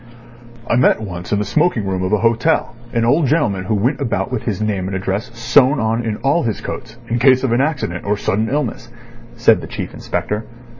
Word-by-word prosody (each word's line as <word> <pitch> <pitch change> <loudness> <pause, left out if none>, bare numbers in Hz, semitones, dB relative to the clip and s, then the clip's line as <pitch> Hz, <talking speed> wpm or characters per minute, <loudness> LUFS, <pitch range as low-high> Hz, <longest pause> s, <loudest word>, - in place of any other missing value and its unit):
"I 115 - +2
met 125 - +4
once 90 -5 -7
in 105 - +2
the 105 - -1
smoking 150 - +1
room 95 -1 -2
of 95 +1 -1
a 105 - +4
hotel 115 +4 +1 0.2
an 115 -1 +1
old 140 +5 +3
gentleman 105 - +1
who 110 - 0
went 125 +8 0
about 130 - -1
with - - -2
his - - -3
name 100 -4 -1
and 95 - -3
address 95 +6 -3
sewn 130 +4 +4
on 115 +2 0
in 110 -2 -2
all 140 +5 +3
his 115 -8 -2
coats 115 0 -7
in 120 +1 -1
case 130 +1 +5
of 130 - +1
an 120 +2 +3
accident 135 - -2
or 105 +1 0
sudden 110 +2 0
illness," 130 -4 -2 0.5
said - - +4
the - - -7
Chief - - -6
Inspector. 105 +1 -3
115 Hz, 215 wpm, -18 LUFS, 105-130 Hz, 0.5 s, case